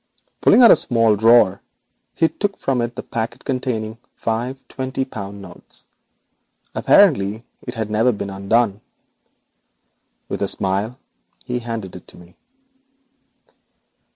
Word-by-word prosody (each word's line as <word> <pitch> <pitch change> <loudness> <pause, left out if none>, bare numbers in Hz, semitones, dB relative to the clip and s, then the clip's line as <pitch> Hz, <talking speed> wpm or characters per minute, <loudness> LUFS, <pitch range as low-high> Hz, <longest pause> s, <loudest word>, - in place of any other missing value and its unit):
Pulling 250 - +6
out 235 - +9
a - - +9
small 115 -3 +2
drawer 110 -3 +4 0.5
he 165 - +3
took 200 +4 -3
from 130 -3 -1
it 120 +1 -3
the - - -6
packet 115 +2 -5
containing 125 -5 -2
the 115 - -24 0.2
five 120 +4 -3
twenty 130 0 -3
pound 100 -5 -8
notes. 90 -2 -13 0.9
Apparently 115 - +3 0.2
it 120 - -5
had 110 -2 -4
never 115 +4 +3
been 100 -3 -5
opened. 100 +2 0 1.5
With - - -5
a - - +1
smile 100 +6 -1 0.5
he 125 -1 -2
handed 115 -5 -6
it - - -12
to - - -16
me. 90 0 -17
115 Hz, 130 wpm, -20 LUFS, 100-125 Hz, 1.5 s, out